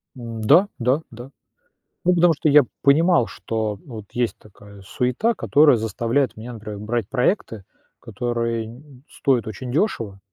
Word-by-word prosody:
М, 115 Hz, -2 st, -7 dB
да, 185 Hz, -, +5 dB
да, 130 Hz, +6 st, +1 dB
да, 120 Hz, +4 st, -11 dB, 0.7 s
ну, 180 Hz, 0 st, +4 dB
потому 170 Hz, -1 st, +4 dB
что 150 Hz, +1 st, 0 dB
я 145 Hz, -1 st, +7 dB, 0.2 s
понимал, 155 Hz, -1 st, +4 dB
что 110 Hz, -2 st, -3 dB
вот 110 Hz, -5 st, -9 dB
есть 120 Hz, -1 st, -1 dB
такая 100 Hz, -1 st, -16 dB
суета, 125 Hz, -, -1 dB
которая 145 Hz, -4 st, +4 dB
заставляет 115 Hz, +4 st, -1 dB
меня, 120 Hz, +2 st, -8 dB
например, 105 Hz, -2 st, -8 dB
брать 110 Hz, -1 st, -3 dB
проекты, 125 Hz, -, -1 dB, 0.4 s
которые 115 Hz, -2 st, -3 dB
н 115 Hz, +2 st, -11 dB
н 140 Hz, -2 st, -18 dB
стоят 130 Hz, -6 st, 0 dB
очень 120 Hz, +4 st, -6 dB
дёшево, 115 Hz, -, -1 dB
120 Hz, 150 wpm, -22 LUFS, 110-140 Hz, 0.7 s, я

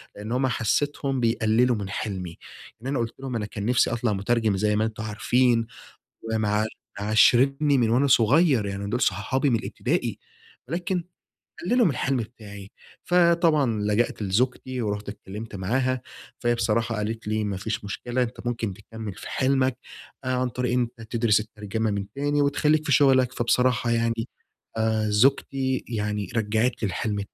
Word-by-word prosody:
لأن 105 Hz, +2 st, -7 dB
هم 130 Hz, +2 st, +1 dB
حسيتهم 135 Hz, +3 st, 0 dB
بيقللوا 115 Hz, +1 st, +2 dB
من 100 Hz, -3 st, -5 dB
حلمي، 95 Hz, -4 st, -4 dB, 0.4 s
إن 125 Hz, -, -6 dB
أنا 135 Hz, -1 st, -1 dB
قلت 115 Hz, -1 st, -2 dB
لهم 135 Hz, -2 st, -5 dB
أنا 110 Hz, -2 st, -1 dB
كان 105 Hz, -1 st, -6 dB
نفسي 120 Hz, +1 st, +3 dB
أطلع 120 Hz, -2 st, 0 dB
مترجم 105 Hz, +1 st, +1 dB
زي 105 Hz, +1 st, +1 dB
ما 110 Hz, +1 st, +2 dB
أنتم 110 Hz, -1 st, -5 dB
عارفين 115 Hz, +2 st, +2 dB, 0.7 s
ومع 105 Hz, -1 st, +1 dB, 0.3 s
معاشرني 135 Hz, +7 st, +4 dB
من 115 Hz, -3 st, +2 dB
وأنا 130 Hz, +5 st, +3 dB
صغيّر 130 Hz, -1 st, +4 dB
يعني 100 Hz, 0 st, -4 dB
دول 120 Hz, -, -1 dB
صحابي 135 Hz, +2 st, +1 dB
من 115 Hz, -, +2 dB
الإبتدائي، -, -, -2 dB, 0.5 s
ولكن 175 Hz, +3 st, -2 dB, 0.6 s
قللوا 240 Hz, +4 st, +3 dB
من 170 Hz, -, +3 dB
الحلم 135 Hz, +1 st, 0 dB
بتاعي، 105 Hz, -4 st, -8 dB, 0.3 s
فطبعًا 165 Hz, -9 st, +3 dB
لجأت 105 Hz, +3 st, 0 dB
لزوجتي 125 Hz, +5 st, -1 dB
ورُحت 105 Hz, -2 st, -3 dB
اتكلّمت 105 Hz, +1 st, -8 dB
معاها، 125 Hz, +7 st, 0 dB, 0.4 s
فهي 120 Hz, 0 st, +1 dB
بصراحة 115 Hz, 0 st, 0 dB
قالت 110 Hz, +1 st, -4 dB
لي: 110 Hz, 0 st, 0 dB
"ما 100 Hz, -2 st, -2 dB
فيش 110 Hz, +3 st, -3 dB
مشكلة 120 Hz, +5 st, -2 dB
أنت 120 Hz, 0 st, -6 dB
ممكن 115 Hz, -4 st, -2 dB
تكمل 105 Hz, +1 st, -8 dB
في 95 Hz, -, -9 dB
حلمك 130 Hz, -1 st, +1 dB, 0.5 s
آآ، 130 Hz, -, -3 dB
عن 125 Hz, 0 st, 0 dB
طريق 125 Hz, 0 st, -2 dB
إن 125 Hz, -1 st, +2 dB
أنت 110 Hz, -1 st, -11 dB
تدرس 115 Hz, -3 st, +3 dB
الترجمة 105 Hz, 0 st, -3 dB
من 100 Hz, -1 st, -2 dB
تاني 145 Hz, +1 st, +1 dB
وتخليك 150 Hz, +2 st, +2 dB
في 140 Hz, -, -1 dB
شغلك،" 130 Hz, -3 st, +4 dB
فبصراحة 125 Hz, -1 st, +1 dB
يعني 115 Hz, 0 st, 0 dB, 0.5 s
آآ، 110 Hz, -1 st, +1 dB
زوجتي 130 Hz, +3 st, +2 dB
يعني 105 Hz, -4 st, -2 dB
رجعت 110 Hz, +2 st, 0 dB
لي -, -, +2 dB
الحلم 105 Hz, +3 st, -2 dB
115 Hz, 160 wpm, -25 LUFS, 105-130 Hz, 0.7 s, معاشرني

